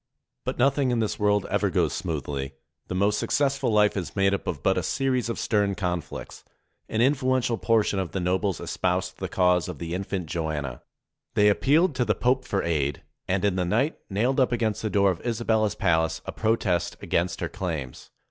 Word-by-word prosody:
But - - -2
nothing 135 +1 +3
in 120 - +1
this 110 -2 -1
world 105 -1 +2
ever - - +2
goes - - +1
smoothly. 70 -4 -4 0.3
The - - -4
most 100 +2 +2
successful 140 -4 +1
life 105 -1 +4
is 95 -4 -4
made 100 -1 +3
up 100 - -3
of 75 -6 -3
but - - +3
a - - 0
series 130 -3 0
of 115 - -2
stern 100 -2 +1
conflicts. 90 -4 -4 0.5
An 110 - 0
influential 130 -3 +2
portion 110 -3 +2
of 95 -4 -3
the 95 - -2
nobles 95 +2 0
espoused 90 0 -2
the 95 - -3
cause 90 -2 +2
of 90 - -6
the 85 +1 -5
infant 95 -1 -3
Joanna. 75 -5 -3 0.5
They 105 0 +5
appealed 150 - +3
to 125 - +3
the 105 -3 +1
Pope 130 +4 +1
for 100 - -1
aid, 75 -4 -1 0.2
and 95 +1 +1
in 95 -2 +1
the 90 - +1
night 115 - 0
nailed 120 +7 +1
up 130 - +3
against 115 -3 0
the 110 - -1
door 100 -1 +3
of 85 - -7
Isabella's 110 -3 +1
palace 80 -1 +1
a - - -4
protest 110 -6 0
against 85 0 -1
her 85 - -1
claims. 80 -10 -5
100 Hz, 195 wpm, -26 LUFS, 90-115 Hz, 0.5 s, They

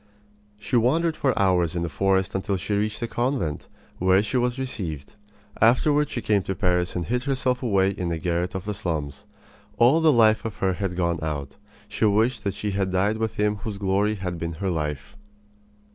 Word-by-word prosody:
She 125 - -3
wandered 155 +8 +2
for 135 -4 0
hours 90 -4 +2
in 85 - -1
the - - -1
forest 95 +2 +1
until 95 +1 -1
she 100 +3 -3
reached 105 +3 -1
a - - -1
convent, 120 - -2 0.3
where 95 +2 +4
she 110 - -4
was 125 0 +1
received. 90 - -5 0.5
Afterward 145 +6 +4
she 120 - -4
came 105 -2 +2
to 95 +1 -4
Paris 90 0 0
and 90 -2 -2
hid 125 +2 -1
herself 130 -2 0
away 100 -6 +2
in 90 -3 -3
a 85 - -1
garret 90 +2 -2
of 95 0 -4
the 105 - -2
slums. 75 -7 -4 0.5
All 125 +9 +5
the 160 -1 +5
light 110 -4 +5
of 110 -3 -5
her 95 -2 0
life 90 - -2
had 95 -3 -2
gone 85 -2 0
out. 75 -3 -4 0.3
She - - -1
wished 110 +4 +2
that 100 -1 -1
she 105 - -3
had 95 -1 -1
died 100 +4 +1
with 110 -1 -2
him 105 0 +1
whose 100 0 -6
glory 100 +2 +1
had 90 -3 -5
been 85 0 -3
her 95 +4 -2
life. 75 -4 -4
100 Hz, 205 wpm, -24 LUFS, 90-115 Hz, 0.5 s, All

